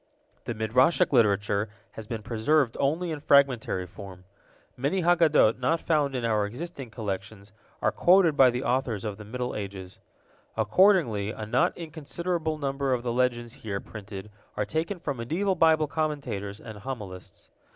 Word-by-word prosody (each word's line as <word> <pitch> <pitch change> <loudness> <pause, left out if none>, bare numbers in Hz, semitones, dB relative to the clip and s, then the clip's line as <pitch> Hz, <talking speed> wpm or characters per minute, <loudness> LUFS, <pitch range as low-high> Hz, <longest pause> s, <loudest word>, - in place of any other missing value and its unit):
The 120 -1 -3
Midrashic 125 +9 +3
literature 105 -2 +2 0.2
has 110 -1 -9
been 110 -2 -5
preserved 120 +3 +1
only 160 +5 0
in 155 - -4
fragmentary 135 -10 +3
form. 90 0 -11 0.5
Many 145 +9 -1
Haggadot 160 -9 +4
not 160 +6 +1
found 150 -5 +1
in 125 -2 -1
our 105 -3 +1
existing 135 +2 -7
collections 100 -1 -6 0.3
are - - +3
quoted 175 -3 +4
by 135 -3 +7
the 125 +2 -2
authors 125 -6 -1
of 105 -2 -4
the 105 - -9
Middle 125 +4 -4
Ages. 95 -2 -7 0.6
Accordingly, 160 - +3
a 110 -1 -5
not 165 +11 +1
inconsiderable 160 0 -3
number 135 -2 -1
of 120 -1 -1
the 120 -1 -1
legends 120 -1 0
here 100 -3 -3
printed 105 -1 -9 0.3
are 105 - 0
taken 165 - -2
from 145 -5 -3
medieval 170 +12 0
Bible 160 -3 +4
commentators 140 -10 -3
and 110 -3 -10
homilists. 105 -7 -8
125 Hz, 150 wpm, -27 LUFS, 105-155 Hz, 0.6 s, by